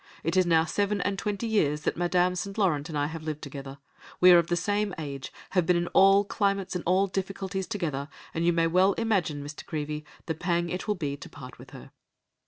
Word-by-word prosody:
It 165 +3 -1
is 185 -1 +4
now 165 -1 +4
seven 200 +4 0
and 200 +1 -1
twenty 210 +1 -2
years 150 -10 +1
that - - -1
Madame 180 +1 +2
St. 195 +3 -5
Laurent 165 -7 +1
and 155 - -3
I 145 - +1
have 160 +2 -5
lived 155 -1 -5
together; 140 -1 -8 0.4
we 180 0 +8
are 175 - +8
of 170 - 0
the 175 - +1
same 205 +3 -1
age, 140 -4 -6 0.2
have 180 -4 +1
been 180 - +4
in 175 0 +1
all 195 +1 +6
climates 200 -2 -1
and 180 - -2
all 185 +2 +4
difficulties 195 0 -3
together, 155 -9 -3 0.2
and 165 - -1
you 175 - +4
may 165 -1 +2
well 185 +4 +4
imagine, 185 -11 0
Mr. 145 +1 -8
Creevey, 150 0 -4 0.2
the 160 - -1
pang 170 +1 -1
it 180 - -4
will 210 - +1
be 145 -6 -3
to - - -10
part 130 -3 -11
with - - -12
her." - - -12
175 Hz, 225 wpm, -27 LUFS, 155-195 Hz, 0.4 s, we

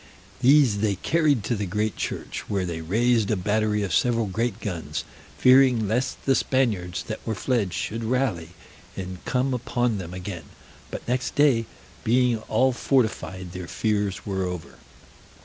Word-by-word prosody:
These 130 -5 +5
they 105 -1 +1
carried 150 - +2
to 120 - 0
the 100 -2 -3
great 105 +2 -1
church, - - -4
where 100 -3 0
they 85 -2 -4
raised 115 +5 +2
a 110 - +2
battery 105 +2 0
of 95 - -2
several 115 -2 +2
great 110 +2 -2
guns, 80 -9 -4 0.3
fearing 125 -4 +5
lest 120 +5 -1
the 135 - +4
Spaniards 105 -11 0
that 110 - -5
were 110 - -2
fled 110 -3 0
should 115 +7 -3
rally, 110 -9 0 0.5
and 95 -1 -6
come 130 +1 0
upon 120 -3 0
them 90 -2 -6
again; 90 -3 -6 0.4
but - - -7
next 125 +1 -1
day, 130 -6 +4 0.4
being 120 0 +3
all 130 +4 +3
fortified, 110 -8 0
their 90 -1 -7
fears 105 -2 -1
were 95 -2 -2
over. 90 -2 -6
110 Hz, 155 wpm, -25 LUFS, 95-125 Hz, 0.5 s, These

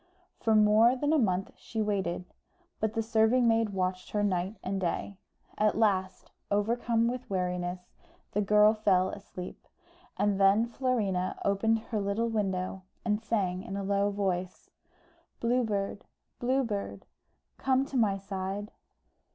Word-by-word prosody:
For 220 -1 +2
more 215 +3 +5
than 290 +4 0
a 315 - +4
month 190 -5 0
she 225 - -6
waited; 195 -4 -1 0.5
but 220 0 -1
the 225 - +1
serving 225 +2 +3
maid 225 -1 +3
watched 185 -1 -2
her 210 -1 0
night 190 0 0
and 190 +1 -2
day. 190 +2 -2 0.4
At 215 0 +2
last, 190 -4 0 0.2
overcome 230 +3 +1
with 250 +1 -4
weariness, 180 -1 -3 0.4
the 210 - 0
girl 210 +1 +5
fell 190 -4 +2
asleep, 185 -2 -9 0.5
and 200 -1 +1
then 200 +4 +5
Florina 225 -7 -1
opened 210 +3 +2
her 220 - -1
little 200 +4 0
window, 190 -3 -2 0.2
and 210 -1 +1
sang 195 -5 -1
in 195 +1 -6
a 200 - -3
low 200 +1 +1
voice 185 -3 -3 0.7
"Blue 245 +2 +2
Bird, 200 -2 -2 0.4
Blue 260 +2 +1
Bird, 205 -4 -4 0.5
Come 265 0 +2
to 275 - -9
my 210 -5 +3
side." 195 +1 -5
205 Hz, 145 wpm, -29 LUFS, 190-225 Hz, 0.7 s, more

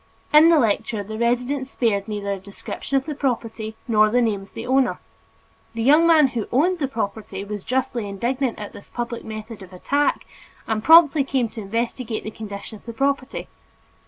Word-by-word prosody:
In 310 +2 +8
the 335 - +6
lecture 220 -3 0
the 220 +2 -7
resident 250 +3 0
spared 220 -6 0
neither 205 -2 -3
a 195 - -3
description 200 +7 -4
of 265 - -1
the 305 - -3
property 230 -5 -3
nor 215 -2 +4
the 245 +3 +2
name 220 -5 +1
of 195 - -15
the 225 - -5
owner. 260 0 +2 0.8
The 225 - -2
young 300 +6 +6
man 310 -5 +6
who 230 -4 -3
owned 345 +8 +2
the 275 - 0
property 210 -5 -4
was 205 -1 -6
justly 245 -4 -1
indignant 245 +5 -1
at 210 -1 -7
this - - -13
public 240 -1 -4
method 215 0 -8
of 190 -1 -12
attack 285 +11 0 0.4
and 220 -1 -2
promptly 320 -2 +7
came 265 -4 0
to 225 - -8
investigate 230 +2 -3
the 215 - -5
condition 210 0 -8
of - - -28
the 230 - -5
property. 275 +2 -1
235 Hz, 190 wpm, -22 LUFS, 215-270 Hz, 0.8 s, In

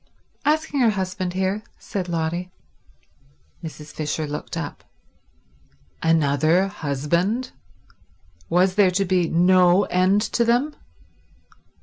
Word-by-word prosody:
"Asking 300 -1 +1
her 240 -3 +5
husband 185 -2 -3
here," 190 +3 -1 0.2
said 185 -3 -5
Lotty. 170 +2 -2 1.1
Mrs. 155 -2 -9
Fisher 155 0 -3
looked 150 0 -6
up. - - -6 1.2
Another 160 +3 +2
husband? 170 - -1 1.0
Was 185 +2 +3
there 200 -1 +4
to 195 +2 0
be 180 -2 +1
no 180 +2 +4
end 185 +3 +2
to 235 +2 0
them? 245 +6 +1
185 Hz, 100 wpm, -23 LUFS, 165-205 Hz, 1.2 s, her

